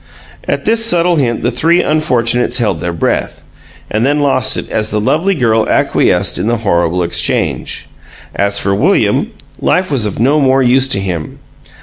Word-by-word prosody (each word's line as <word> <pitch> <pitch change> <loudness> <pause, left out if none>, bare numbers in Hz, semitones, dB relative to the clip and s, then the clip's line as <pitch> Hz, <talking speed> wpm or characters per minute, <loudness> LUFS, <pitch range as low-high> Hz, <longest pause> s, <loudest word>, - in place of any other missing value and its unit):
At - - -2
this 225 0 +1
subtle 175 -5 +2
hint 120 -5 -1
the 120 - +1
three 165 +9 +2
unfortunates 125 -5 0
held 105 -10 -1
their 90 - -2
breath, 85 - -2 0.4
and 110 +2 -1
then 145 +3 +1
lost 145 -2 +2
it - - -4
as 110 0 -1
the 105 - -1
lovely 165 - 0
girl 115 -6 +1
acquiesced - - +1
in - - -2
the 120 0 +1
horrible 85 -1 +1
exchange. 85 - -2 0.5
As 100 0 0
for 100 -1 0
William, 100 - +1 0.3
life 185 -1 0
was 120 -7 +1
of 100 - -5
no 140 +6 +2
more 135 -1 +2
use 130 +2 +3
to 100 - 0
him. 90 -5 -5
120 Hz, 175 wpm, -13 LUFS, 100-145 Hz, 0.5 s, use